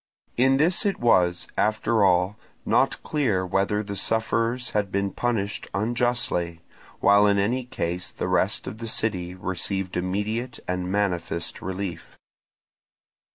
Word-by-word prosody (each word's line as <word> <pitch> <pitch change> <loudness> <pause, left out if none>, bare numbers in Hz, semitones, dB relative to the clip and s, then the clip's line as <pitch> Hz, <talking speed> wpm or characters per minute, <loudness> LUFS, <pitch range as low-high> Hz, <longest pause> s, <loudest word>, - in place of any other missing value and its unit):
In 135 +2 +4
this 165 +5 +3
it 200 -2 0
was, 90 -7 +3
after 110 0 +2
all, 90 +1 +3 0.3
not - - +2
clear 115 -12 0
whether 100 +3 0
the 100 -1 -5
sufferers 115 +4 0
had 100 -2 0
been 100 0 0
punished 110 -3 -2
unjustly, 110 -7 0 0.4
while 100 +1 +6
in 100 0 +3
any 120 +6 0
case 90 -7 -3
the - - -4
rest - - +1
of 110 - -7
the 115 - -5
city 90 -5 0
received 95 +1 -3
immediate 105 +7 -2
and 90 0 -2
manifest 90 -4 -1
relief. 90 -3 -5
100 Hz, 130 wpm, -25 LUFS, 90-115 Hz, 0.4 s, while